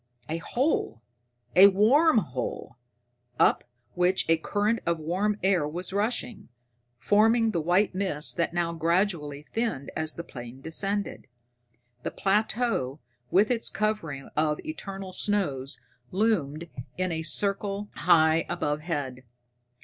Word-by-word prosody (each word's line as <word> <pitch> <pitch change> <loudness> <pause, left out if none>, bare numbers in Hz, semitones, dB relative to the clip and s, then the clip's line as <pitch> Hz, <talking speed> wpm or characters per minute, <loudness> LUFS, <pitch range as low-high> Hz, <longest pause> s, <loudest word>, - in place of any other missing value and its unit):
A 160 - -1
hole 235 - -1 0.5
a 190 +2 +10
warm 235 - +4
hole, 125 - -3 0.6
up - - +4 0.3
which 180 +1 +1
a 165 0 +4
current 205 +7 0
of 170 0 0
warm 185 +7 -1
air 185 -6 +3
was 180 +5 -5
rushing, 220 +3 -2 0.5
forming 225 - +3
the 170 - -1
white 180 +6 +2
mist 185 -6 -1
that 170 - 0
now 170 -1 -1
gradually 165 -3 0
thinned 225 - -2
as 155 0 -3
the 170 - -5
plane 120 -4 -9
descended. 195 +7 -3 0.7
The - - -3
plateau 205 - 0 0.3
with 205 +6 +3
its 230 -2 0
covering 210 -11 -2
of 150 0 +1
eternal 195 -11 -6
snows 150 -11 -1 0.3
loomed 170 -7 0 0.3
in 185 -1 0
a 165 - -1
white 160 - -4
circle 200 +4 0
high 160 -2 +4
overhead. 145 -4 -2
180 Hz, 125 wpm, -27 LUFS, 155-205 Hz, 0.7 s, a